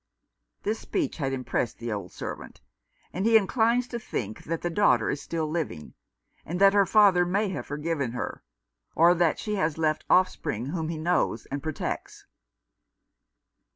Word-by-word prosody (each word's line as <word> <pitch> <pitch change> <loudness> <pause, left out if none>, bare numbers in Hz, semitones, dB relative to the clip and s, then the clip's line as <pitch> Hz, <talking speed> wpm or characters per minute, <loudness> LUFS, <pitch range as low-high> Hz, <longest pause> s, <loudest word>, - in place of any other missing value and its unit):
This 215 +2 -1
speech 330 -7 -2
had 135 -4 -1
impressed 130 -3 -2
the 120 -1 -5
old 105 -1 -4
servant; - - -7 0.5
and 185 - -2
he 225 +1 +6
inclines 230 +4 +2
to 235 - -4
think 110 - -5
that 165 +1 -3
the 175 - 0
daughter 145 - +3
is 140 - -4
still 160 -2 -3
living, 155 - -4 0.5
and 175 +3 -4
that 195 0 +6
her 200 -2 +4
father 200 -5 +5
may 195 +4 0
have 190 - -5
forgiven 145 -4 -2
her, 125 - -4 0.5
or 170 +2 +6
that 170 -2 +2
she 210 -1 -3
has 160 -5 0
left 155 -1 0
offspring 155 - +2
whom 160 +2 -3
he 165 - -3
knows 160 -8 0
and 140 +1 -3
protects. 155 -1 -5
165 Hz, 160 wpm, -27 LUFS, 145-200 Hz, 0.5 s, he